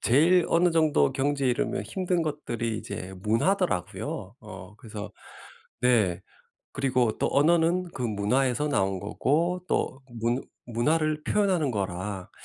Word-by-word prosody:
제일 165 +8 +4
어느 175 +1 +3
정도 155 - +3
경지에 140 -1 0
이르면 120 - -1
힘든 180 -2 -1
것들이 120 -7 -3
이제 95 -1 -7
문화더라고요. 115 - -1
어 100 -2 -11
그래서 105 -2 -8 0.7
네 105 -8 +3 0.5
그리고 130 -5 +1
또 - - +1
언어는 170 +4 +3
그 125 - -5
문화에서 125 +6 +1
나온 95 -8 0
거고 165 - 0
또 135 +1 -1 0.2
문 120 +3 0 0.2
문화를 150 +6 0
표현하는 185 -9 +1
거라 95 -2 -4
130 Hz, 275 characters per minute, -27 LUFS, 105-160 Hz, 0.7 s, 제일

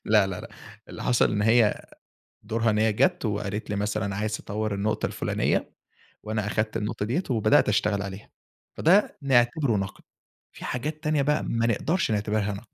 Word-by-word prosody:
لا 105 -2 +4
لا 95 -2 -5
لأ، - - -9 0.4
اللي - - -8
حصل 125 -1 +3
إن 105 -1 0
هي 115 -1 +3 0.6
دورها 110 +1 0
إن 105 - +1
هي 110 0 +3
جَات 180 - +1
وقالت 105 -1 -3
لي 105 - -1
مثلًا 105 -1 -2
عايز 105 +1 -1
تطوّر 105 0 -3
النقطة 105 +2 -1
الفلانية، - - -1 0.5
وأنا 105 -1 -2
أخدت 110 +2 -1
النقطة 105 -1 -3
ديَّة 130 - -1
وبدأت 110 -4 +3
أشتغل 105 -1 +1
عليها. 100 0 -7 0.5
فده 190 +6 +3
نعتبره 120 -2 +2
نقد، 95 0 -5 0.5
في - - -9
حاجات 155 +6 -4
تانية 150 -1 +1
بقى 150 +2 +1
ما 115 0 0
نقدرش 155 - 0
نعتبرها 105 0 0
نقد. 100 +4 -9
110 Hz, 170 wpm, -26 LUFS, 105-120 Hz, 0.6 s, لا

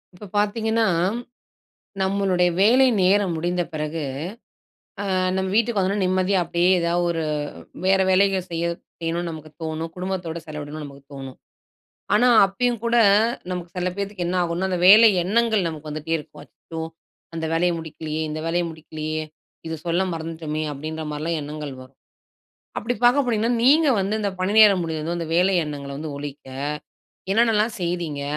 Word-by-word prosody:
இப்ப 205 - -11
பார்த்தீங்கன்னா, 220 +2 +1 1.2
நம்மளுடைய 190 -2 +2
வேலைநேரம் 205 -6 +4
முடிந்தபிறகு, 165 -2 -2 1.0
அ - - -3 0.3
நம்ம 190 0 -1
வீட்டுக்கு 230 0 +2
வந்தவுடனே 195 +2 0
நிம்மதியா 185 +1 +2
அப்பிடியே 175 +2 +2
எதா 170 0 0 0.2
ஒரு 165 -1 -1 0.6
வேற 190 +1 +4
வேலைகள் 190 -1 +2
செய்ய 170 0 -2 0.4
செய்யணுனு 170 +1 -2
நமக்கு 155 -1 -9
தோணும், 160 +1 -3
குடும்பத்தோட 180 -3 -3
செலவிடணும்னு 150 0 -6
நமக்கு 140 -1 -12
தோணும்.ஆனா, 135 -1 -11 0.9
அப்பயும் 235 +3 -1
கூட 235 0 +2 0.6
நமக்கு 175 -1 -5
சில 180 0 0
பேத்துக்கு 200 -3 -3
என்ன 185 - -1
ஆகுன்னா, 175 +2 -1
அந்த 180 - 0
வேலை 220 +3 +9 0.2
எண்ணங்கள் 220 -1 +2
நமக்கு 155 -1 -7
வந்துட்டே 155 +2 -3
இருக்கும். 150 -1 -12
அச்சச்சோ! 160 +1 -9 0.5
அந்த 165 -1 -3
வேலைய 175 +2 +2
முடிக்கலயே! 160 -1 -5
இந்த 155 +1 -4
வேலைய 175 +1 +1
முடிக்கலயே! 155 0 -5 0.4
இத 160 0 -4
சொல்ல 170 +2 +1
மறந்துட்டோமே! 160 -1 -4
அப்பிடின்றமாரிலாம் 155 +2 -4
எண்ணங்கள் 150 0 -6
வரும். 130 +1 -17 0.8
அப்பிடி 240 +3 -2
பார்க்க 275 +3 +4
போனீங்கன்னா, 230 0 +1
நீங்க 300 +4 +5
வந்து 195 +2 -1
இந்த 200 - 0
பணி 185 +2 0
நேரம் 200 -4 +7
முடிஞ்சதும், 160 +1 -3
இந்த 165 -2 -4
வேலை 185 +2 +3
எண்ணங்கள 140 -2 -6
வந்து 155 0 -5
ஒழிக்க, 145 0 -8 0.9
என்னென்ன 225 +2 +3
எல்லாம் 215 +2 +1
செய்தீங்க? 170 -5 -2
175 Hz, 140 wpm, -23 LUFS, 155-200 Hz, 1.2 s, வேலை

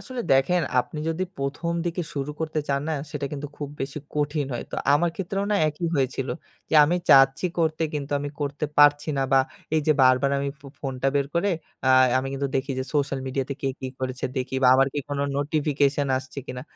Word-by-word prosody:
আসলে 255 -2 -6
দেখেন 165 +7 +3 0.2
আপনি 150 - -8
যদি 170 +3 -1
১ম 145 +5 -2
দিকে 175 +1 -2
শুরু 140 +1 -2
করতে 155 -1 -1
চান 140 0 +1
না - - 0 0.2
সেটা 145 -3 -3
কিন্তু 145 0 -4
খুব 145 - -5
বেশি 135 +2 -3 0.2
কঠিন 145 -1 0
হয়। 120 - -4
তো - - -4 0.2
আমার 170 +3 +2
ক্ষেত্রেও 195 +1 -2
না - - +3
একই 155 +3 -3
হয়েছিল। 135 0 -1 0.4
যে - - 0
আমি 175 +4 +1
চাচ্ছি 135 +5 +6
করতে 160 -1 +1
কিন্তু 145 -1 -3
আমি 145 0 -4
করতে 145 +1 -2
পারছি 145 +1 +5
না। 135 - +1
বা 135 - +7 0.3
এই 155 - +3
যে 155 - +6
বারবার 130 +2 +4
আমি 140 0 -1
ফো 140 - -13
ফোনটা 135 -1 -1
বের 140 -1 +2
করে 185 +4 +2 0.4
আ - - +4 0.3
আমি 130 - -2
কিন্তু 140 +1 -1
আ - - -13
দেখি 135 +1 -2
যে 130 - -1
সোশ্যাল 140 -2 0
মিডিয়াতে 135 +1 -2
কে 135 - +1
কি 130 - -4
করেছে 130 0 -3
দেখি 130 +1 -3
বা 125 - +6
আমার 135 0 +5
কি - - -1
কোনো 140 0 -1
নোটিফিকেশন 145 -1 +1
আসছে 130 +1 -9
কিনা? 125 -2 -6
140 Hz, 210 wpm, -25 LUFS, 135-155 Hz, 0.4 s, বা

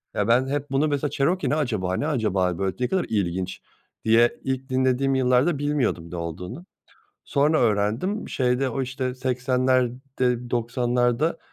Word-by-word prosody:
Eee, 105 - 0
ben 125 +3 +3
hep 145 0 -3
bunu 140 +3 +2
mesela 145 0 -1
"Cherokee 175 +7 +1
ne - - +2
acaba, 110 -11 -1
ne 145 - -1
acaba 95 - 0
böyle? 95 -1 -1
Ne 125 - +1
kadar 190 +3 0
ilginç." 95 -3 -2 0.4
diye, 115 +2 +4
ilk 130 0 -3
dinlediğim 130 +1 +2
yıllarda 130 +5 +3
bilmiyordum 140 - -1
ne - - -5
olduğunu. 90 - -6 0.6
Sonra 150 +3 +2
öğrendim, 115 - 0
şeyde 125 +1 +1
o 130 +2 -2
işte 130 0 -3
80'lerde, 125 -1 0
90'larda 120 +4 0
125 Hz, 145 wpm, -24 LUFS, 115-135 Hz, 0.6 s, diye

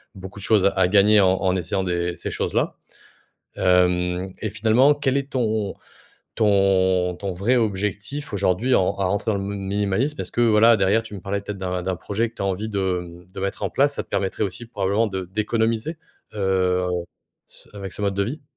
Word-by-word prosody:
beaucoup 95 +1 -9
de - - -9
choses 105 -4 +4
à 95 -2 +3
gagner 105 +1 +5
en 95 -1 +4
en 95 -1 +1
essayant 95 +2 -1
des 85 -1 -1
ces - - -4
choses-là. - - -1 0.8
Hem, 90 0 +2
et 110 - -2
finalement, 110 +7 +4
quel 140 -2 0
est 140 0 -3
ton 110 -5 -1 0.6
ton 95 -3 +2
ton 100 - -4
vrai 100 +8 +1
objectif 105 +5 -2
aujourd'hui 100 +5 +1
en - - +4
en 90 - +1 0.2
rentrant 100 +3 0
dans - - -1
le - - -4
m 100 - -4 0.2
minimalisme? 105 +9 0
Parce, - - -5
voilà, 115 -1 +5
derrière, 100 +3 +3
tu 110 -2 -9
me 95 - -8
parlais 100 +2 -3
peut-être 100 0 -6
d'un 90 -1 -2
d'un 95 0 -1
projet 110 +5 -2
que 115 - -30
tu - - -7
as - - 0
envie 100 +3 -2
de, 95 -3 -1
mmh, 90 +1 -13
de 100 - -7
mettre 100 0 -3
en - - 0
place, 140 +1 +2
ça - - -3
te - - -31
permettrait 95 +2 -1
aussi, 100 +4 -4
probablement 105 +1 0
de 95 -2 -4
d'économiser, 110 - -1 0.4
heu, 95 -2 +1 0.6
ce - - -18
avec 100 -2 -6
ce - - -6
mode 100 -1 +1
de 100 - +1
vie? 140 +8 -5
100 Hz, 205 wpm, -23 LUFS, 95-110 Hz, 0.8 s, gagner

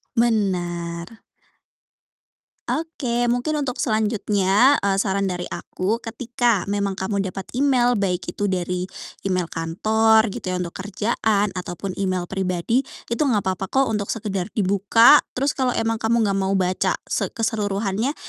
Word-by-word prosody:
Benar 180 -4 -1 1.5
Oke, 250 -7 -1
mungkin 245 +6 0
untuk 260 -3 -2
selanjutnya, 215 +2 +2
eee, 195 -1 +1
saran 195 0 0
dari 180 -1 -3
aku 205 +5 -2
ketika 235 -2 0
memang 200 -1 -1
kamu 200 +2 -2
dapat 195 0 -3 0.2
email, 245 -4 +3
baik 185 -2 -1
itu 205 - -2
dari 180 -1 -2 0.4
email 185 -3 -1
kantor, 220 +6 +2
gitu - - -7
ya, 185 - -1
untuk 170 - -6
kerjaan, 205 +1 0
ataupun 180 +1 -5
email 185 -2 0
pribadi, 190 +5 0 0.3
itu 235 - -1
enggak 245 -10 +2
papa 190 +1 -4
kok 270 +6 +2
untuk 205 -2 -1
sekedar 195 -5 -3
dibuka. 205 +6 +6 0.2
Terus, 270 +2 +1
kalau 260 -2 -1
emang 225 0 0
kamu 225 +1 +2
enggak 195 -1 +1
mau 195 0 0
baca 185 -1 +1
se - - -1
keseluruhannya 215 +3 -1
205 Hz, 140 wpm, -22 LUFS, 190-230 Hz, 1.5 s, dibuka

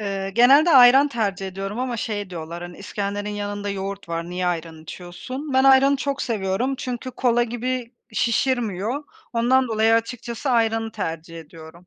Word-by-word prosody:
Eee, 195 -2 -3
genelde 275 +8 +6
ayran 265 +1 +7
tercih 200 -7 -2
ediyorum 195 +4 -5
ama 250 -2 -2
şey 205 -3 -4
diyorlar: 170 0 -7
"Hani 175 0 -9
iskenderin 205 +1 -4
yanında 205 0 -4
yoğurt 200 -1 -5
var, 170 +1 -4
niye 180 0 -2
ayran 165 -2 -3
içiyorsun?" 255 - -8
Ben 265 +1 +3
ayranı 270 +1 +6
çok 275 0 -2
seviyorum 220 +3 -1
çünkü 250 0 -5
kola 240 -1 +1
gibi 245 +1 -3 0.2
şişirmiyor. 235 +1 0 0.3
Ondan 250 +2 +2
dolayı 220 0 +3
açıkçası 235 +3 -2
ayranı 225 -2 +1
tercih 165 -3 -5
ediyorum. 160 +2 -14
220 Hz, 150 wpm, -22 LUFS, 190-250 Hz, 0.3 s, ayran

